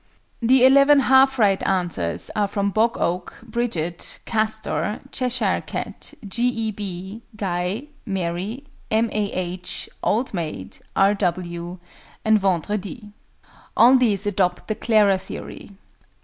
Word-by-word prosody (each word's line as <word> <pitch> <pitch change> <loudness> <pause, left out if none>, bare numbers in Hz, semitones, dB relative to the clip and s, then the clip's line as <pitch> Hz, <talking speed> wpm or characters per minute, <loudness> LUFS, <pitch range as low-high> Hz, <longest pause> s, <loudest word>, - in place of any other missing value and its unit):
The 255 +2 +5
11 280 +2 +6
half 265 0 +5
right 200 -4 +3
answers 170 - -1
are 210 -1 +2
from 200 0 -1
BOG 225 +3 +2
OAK, 175 +1 -2
BRIDGET, 220 -8 -2
CASTOR, 220 -1 -1
CHESHIRE 250 -6 +1
CAT, - - -6
G. 235 +5 +1
E. 225 -3 -1
B., 195 +1 -7
GUY, 185 +1 -2 0.3
MARY, 195 +6 -3 0.3
M. 225 +1 +1
A. 210 -1 -1
H., 180 0 -4
OLD 235 +4 0
MAID, 165 -4 -5 0.2
R. 195 +1 +4
W., 175 -2 -3 0.5
and 220 -1 +5
VENDREDI. 205 +4 -2 0.7
All 245 +3 +7
these 215 -6 +2
adopt 185 -3 0
the 215 - 0
"Clara" 210 -3 +3
theory. 200 +1 -9
205 Hz, 120 wpm, -22 LUFS, 185-230 Hz, 0.7 s, All